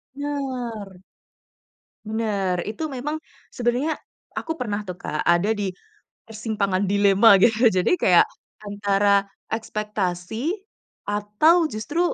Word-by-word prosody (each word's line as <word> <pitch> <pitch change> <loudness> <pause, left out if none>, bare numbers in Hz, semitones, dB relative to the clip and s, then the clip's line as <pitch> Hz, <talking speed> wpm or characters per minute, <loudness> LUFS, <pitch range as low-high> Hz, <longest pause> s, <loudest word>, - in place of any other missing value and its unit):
Bener. 250 -9 -4 1.0
Bener, 210 -4 -1
itu 305 +9 -4
memang 295 +4 -4 0.3
sebenernya 250 +6 0 0.4
aku 320 0 -4
pernah 210 -4 -2
tuh 180 -3 -7
Kak, 155 - -3
ada 175 +6 +3
di 205 -2 -2 0.5
persimpangan 205 -3 -2
dilema 200 +2 +6
gitu. 230 +1 +4
Jadi 190 - +3
kayak - - +6 0.4
antara 200 -1 +2 0.2
ekspektasi 215 - -2 0.5
atau 210 - +3
justru, 260 +10 -3
215 Hz, 100 wpm, -23 LUFS, 200-250 Hz, 1.0 s, dilema